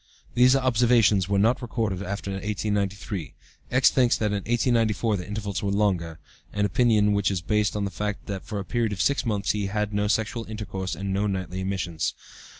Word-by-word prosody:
"These 125 +2 +5
observations 115 -7 +3
were 100 - +2
not 115 +7 +3
recorded 110 -6 -2
after 100 +1 -4
1893. 100 -2 -3 0.3
X. 130 +1 +4
thinks 125 -3 +3
that 105 -1 0
in 105 - 0
1894 115 -3 +2
the 90 - -7
intervals 100 -3 -3
were 100 - -1
longer, 95 -6 0 0.4
an 105 0 +1
opinion 105 0 +3
which 100 -1 +2
is 95 -2 -1
based 105 +1 0
on 105 -1 -1
the 100 - -4
fact 105 +3 -4
that 95 -1 -5
for 115 -3 -5
a 100 - -4
period 115 0 0
of 95 - -7
six 140 -2 +1
months 105 -2 0
he 105 -2 -2
had 105 +1 -2
no 105 0 +1
sexual 110 +2 -1
intercourse 95 -3 -5
and 100 0 -3
no 100 +2 +1
nightly 95 -1 -3
emissions. 95 -4 -2
105 Hz, 190 wpm, -25 LUFS, 95-110 Hz, 0.4 s, These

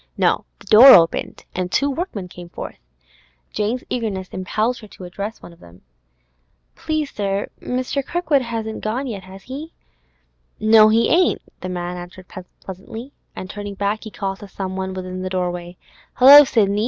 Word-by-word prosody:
No; - - +1
the - - -18
door 255 +5 +10
opened, 165 -2 +1
and 180 0 -3
two 280 - +2
workmen 280 - -4
came 175 -1 -11
forth. - - -8 0.7
Jane's 220 +4 -2
eagerness 205 -6 -3
impelled 220 +6 -2
her 215 - -12
to 195 - -13
address 200 +5 -6
one 175 - -11
of 170 - -21
them. 85 +1 -17 0.9
'Please, 310 -2 -3
sir, 200 -1 -2
Mr. 255 +2 -2
Kirkwood 320 -3 0
hasn't 225 -2 -5
gone 235 +6 -2
yet, 215 -7 -5
has 190 +1 -12
he?' 290 +5 -8 0.9
'No, 215 0 +6
he 225 +1 +3
ain't,' 355 +2 +2 0.2
the 185 - -6
man 180 0 -4
answered 175 +1 -10 0.4
pleasantly; 220 +8 -9 0.2
and 185 - -7
turning 205 0 -7
back, 205 +2 -2
he 220 - -7
called 195 -2 -4
to 205 - -10
some 190 -1 -5
one 190 0 -4
within 185 0 -6
the 185 - -3
doorway; 180 -1 -3 0.4
'Hello, 280 +3 +9
Sidney! 205 -5 +1
205 Hz, 165 wpm, -20 LUFS, 185-250 Hz, 0.9 s, door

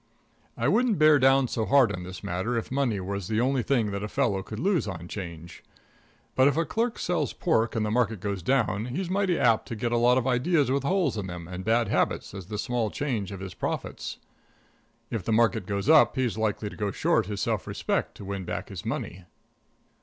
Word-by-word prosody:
I - - 0
wouldn't 235 -3 +3
bear 155 -1 +6
down 135 0 +4
so 115 - -2
hard 130 -2 +4
on 90 - -5
this 90 +1 -8
matter 100 +8 -2
if 115 - -4
money 130 -6 0
was 100 0 -4
the 110 +1 0
only 130 +2 +2
thing 115 -4 +1
that 100 0 -3
a 105 - -3
fellow 100 -2 0
could 105 +3 -8
lose 180 - +1
on 85 -3 -6
'Change. 85 -3 -8 0.7
But 130 +1 +5
if 145 +1 +2
a 165 - +2
clerk 230 +4 -1
sells 175 0 -1
pork, 115 -10 +1
and 110 -1 0
the 105 - -1
market 115 -3 +1
goes 100 -1 -3
down, 115 -1 +1
he's 175 +8 -3
mighty 190 -3 +1
apt 115 -2 +3
to 115 - -5
get 115 +2 -2
a 120 - +2
lot 125 +2 +4
of 130 - 0
ideas 135 +2 +2
with 140 +1 +1
holes 150 - +1
in 100 -2 -3
them 85 -2 -7
and 90 +1 -6
bad 115 +2 +2
habits - - 0
as 95 -3 -8
the 105 0 -5
small 115 0 -1
change 115 -7 -3
of 95 -1 -7
his 95 -2 -6
profits. - - -4 0.9
And 115 - -1
if - - -11
the 115 - -2
market 110 -3 +2
goes 100 +2 -2
up, 155 -2 +6
he's 130 -4 0
likely 105 -1 -1
to - - -10
go 105 -2 -2
short 95 - +1
his 105 -1 -4
self - - -1
respect - - -2
to 100 - -10
win 100 -1 -4
back - - -5
his - - -7
money. 90 0 -4
115 Hz, 225 wpm, -27 LUFS, 100-135 Hz, 0.9 s, bear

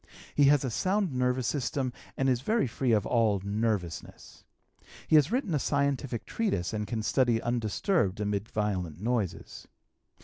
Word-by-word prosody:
He 145 - +4
has 145 0 +5
a 125 - -2
sound 190 - 0
nervous 125 0 0
system 130 0 -1 0.2
and 135 - +1
is 125 -2 +2
very 220 - +1
free 125 +1 -1
from 105 -3 +2
all 110 -4 +2
"nervousness." 100 -5 -3 0.6
He - - +4
has 150 0 +5
written 245 - 0
a 150 - +2
scientific 140 -4 -1
treatise 195 - -1
and 105 -1 -2
can 110 +1 -3
study 120 -1 +2
undisturbed 115 - 0
amid 105 0 -2
violent 90 -7 -2
noises. 110 -3 -3
120 Hz, 150 wpm, -29 LUFS, 105-140 Hz, 0.6 s, has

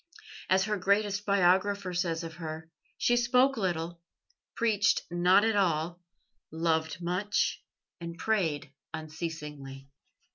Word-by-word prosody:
As 190 +1 +4
her 210 +1 -1
greatest 200 +2 +1
biographer 195 0 +2
says 170 -2 -1
of 165 -1 -8
her: 160 -1 -7 0.3
"She 240 - +3
spoke 250 +3 +3
little, 170 -4 -2 0.5
preached 215 -3 +2
not 180 +4 +4
at 225 -1 +2
all, 175 -2 0 0.5
loved 160 +1 -1
much, 185 +4 0 0.4
and 170 0 -7
prayed 165 -9 -1 0.2
unceasingly." 150 -4 -7
175 Hz, 110 wpm, -29 LUFS, 160-200 Hz, 0.5 s, As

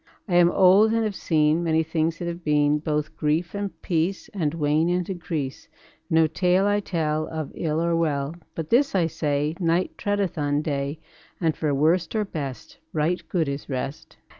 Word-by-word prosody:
I 185 - -3
am 175 -1 +6
old 195 +5 +5
and 230 0 +2
have 215 -2 -1
seen 155 -2 +2
Many 160 -1 +2
things 160 0 -1
that 175 - -4
have 170 0 -5
been; 150 -1 +2
Both 150 -1 -2
grief 160 +3 0
and 200 -1 -4
peace 175 +3 -1
And 165 -6 -1
wane 155 +1 +2
and 180 0 0
increase. 160 -7 -4 0.4
No 160 0 +4
tale 180 +4 +2
I 205 0 +2
tell 155 -5 -1
Of 155 -3 -5
ill 160 -1 -1
or 170 0 +1
well, 150 -2 0 0.2
But 160 -2 -5
this 265 0 +3
I 180 -3 +3
say: 150 -1 -1
Night 170 +1 +1
treadeth 205 -4 -1
on 145 0 0
day, 140 0 -2 0.4
And 165 -3 +1
for 155 -2 -1
worst 160 +7 +2
or 215 -1 +1
best 140 -9 -6
Right 160 +4 0
good 165 -5 0
is 140 +1 -5
rest. 135 +1 -5
160 Hz, 185 wpm, -24 LUFS, 150-180 Hz, 0.4 s, am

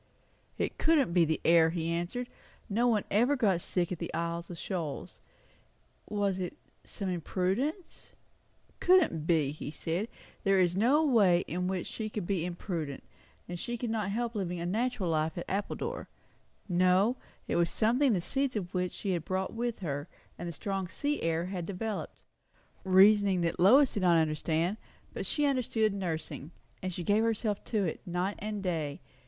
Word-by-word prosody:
It - - -2
couldn't 305 - +3
be 175 -2 +5
the 160 0 0
air, 165 -1 +6
he 165 0 -2
answered; 175 +9 -2 0.4
nobody 225 0 +2
ever 240 +8 +4
got 200 -9 +2
sick 175 0 -1
at 180 - -3
the 170 - -4
Isles 170 0 -3
of 175 - -7
Shoals. 165 -6 -5 0.9
Was 200 -2 0
it 180 -2 -4 0.3
some 200 - -6
imprudence? 190 - -2 0.7
Couldn't 315 - +4
be, 155 -5 +3
he 150 - -6
said; 165 +7 -2 0.4
there 195 -1 +4
was 180 -2 +3
no 265 +10 +4
way 200 - +5
in 180 +2 -3
which 185 -2 -2
she 220 -1 -4
could 210 -4 -4
be 180 -3 0
imprudent; 170 -5 -4 0.5
she 240 +7 -4
could 235 -1 -3
not 215 -3 -1
help 235 +3 -1
living 180 -5 -2
a 170 - -3
natural 220 +1 -1
life 155 +1 0
at 170 - -4
Appledore. 210 - -3 0.6
No, 185 +5 +3 0.3
it - - -1
was 170 -1 +3
something 240 +4 +3
the 180 - +1
seeds 270 +6 -1
of 185 -3 -3
which 180 -1 -1
she 200 - -3
had 170 -3 -1
brought 190 +2 -2
with 235 -1 -3
her; 145 -3 -3 0.3
and 175 0 -5
the - - -6
strong 195 +3 -3
sea 290 +10 -2
air 165 +1 0
had 180 -2 -4
developed 205 +2 -4
it. 190 - -17
Reasoning 195 0 +6
which 165 -1 -1
Lois 255 +10 +6
did 205 - -1
not 175 -2 +5
understand; 160 +4 0 0.4
but - - -4
she 295 - +1
understood 235 -6 +1
nursing, 165 -6 -4 0.3
and 185 - -2
gave 195 +5 +1
herself 220 -2 0
to 215 -3 0
it, 165 - -2
night 180 +3 -1
and 210 -1 -4
day. 160 -6 -2
185 Hz, 170 wpm, -30 LUFS, 170-220 Hz, 0.9 s, air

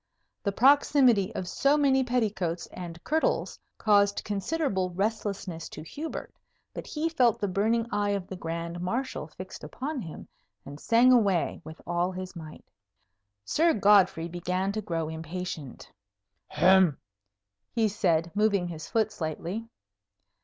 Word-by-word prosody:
The 200 - -1
proximity 250 -4 +4
of 180 - -3
so 280 +9 +2
many 270 -2 +3
petticoats 210 -9 -1
and 175 -2 -7
kirtles 315 +1 0 0.2
caused 205 -2 +3
considerable 205 - -1
restlessness 195 -3 -3
to 155 - -9
Hubert; 300 - -6 0.4
but - - -7
he 310 +1 -2
felt 250 -9 +2
the 205 - 0
burning 220 +5 +1
eye 205 0 0
of 200 -2 -1
the 190 - -7
Grand 170 0 -5
Marshal 230 - -3
fixed 185 +4 -10
upon 275 +1 -4
him, 165 -5 -9 0.4
and 145 +1 -9
sang 235 +7 +5
away 200 -11 +2
with 160 +1 -10
all 175 +1 0
his 185 0 -7
might. 155 -2 -10 0.8
Sir 325 - +3
Godfrey 195 -5 +4
began 180 +3 -2
to 215 +1 -3
grow 165 -5 -2
impatient. 160 -3 -6 0.6
"Hem!" 185 -5 +4 0.7
he 225 -2 +2
said, 170 -5 +1
moving 200 -4 +2
his 160 -2 -7
foot 220 -1 +1
slightly. 180 +4 -4
195 Hz, 135 wpm, -28 LUFS, 175-230 Hz, 0.8 s, sang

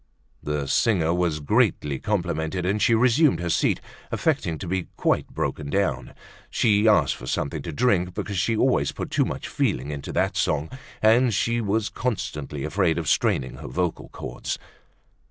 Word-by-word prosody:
The 75 -1 -2
singer 85 - +2
was 85 -3 0
greatly 70 -1 +1
complimented 90 -3 -1
and 100 +3 0
she 115 +3 +4
resumed 125 - +4
her 85 -1 -2
seat - - +2 0.3
affecting 80 - 0
to 95 - -7
be 95 0 -2
quite - - +1
broken 75 -2 -3
down. 70 -9 -1 0.3
She 105 -2 +3
asked 105 - +4
for 65 - -10
something 75 +3 -2
to 85 - -5
drink 90 - +1
because 100 -3 -3
she 115 +4 +1
always 130 +3 +2
put - - -6
too - - +2
much - - -4
feeling 70 +4 -1
into 70 -1 -5
that - - +1
song 75 +1 0 0.3
and 115 +3 +5
she 115 +3 +1
was 105 0 0
constantly 75 - -3
afraid 85 +1 +1
of 85 -3 -3
straining 65 -1 +1
her - - -8
vocal 90 -2 -2
chords. - - -5
90 Hz, 165 wpm, -24 LUFS, 75-105 Hz, 0.3 s, and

